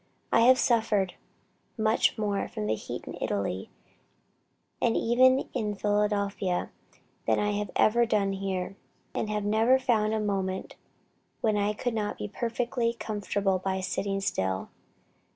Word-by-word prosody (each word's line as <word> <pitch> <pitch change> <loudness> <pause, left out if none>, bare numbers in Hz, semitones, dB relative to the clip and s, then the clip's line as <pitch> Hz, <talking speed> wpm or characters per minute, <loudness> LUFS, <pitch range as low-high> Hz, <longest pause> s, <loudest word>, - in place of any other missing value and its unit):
I - - +5
have 255 +3 +7
suffered 220 -7 +2 0.6
much 220 +2 +2
more 205 -2 -1
from 105 - -4
heat 110 - -3
in - - -7
Italy, 100 -1 -2 1.1
and 230 - +2
even 255 +3 +4
in 210 -1 -1
Philadelphia, 205 -2 0 0.6
than - - +3
I 210 0 +1
have 205 -1 -2
ever 235 +2 +4
done 200 -3 +1
here; 190 -1 -3 0.4
and 215 - -2
have 210 -1 -1
never 225 +5 +4
found 220 -4 +1
a - - 0
moment 190 -2 -2 0.7
when 215 -2 +2
I 205 0 +1
could 245 +3 -2
not 210 -2 -2
be - - -4
perfectly 235 +2 -1
comfortable 205 -3 -1
by 190 0 -1
sitting 195 +1 -2
still. 95 - -1
210 Hz, 135 wpm, -28 LUFS, 195-225 Hz, 1.1 s, have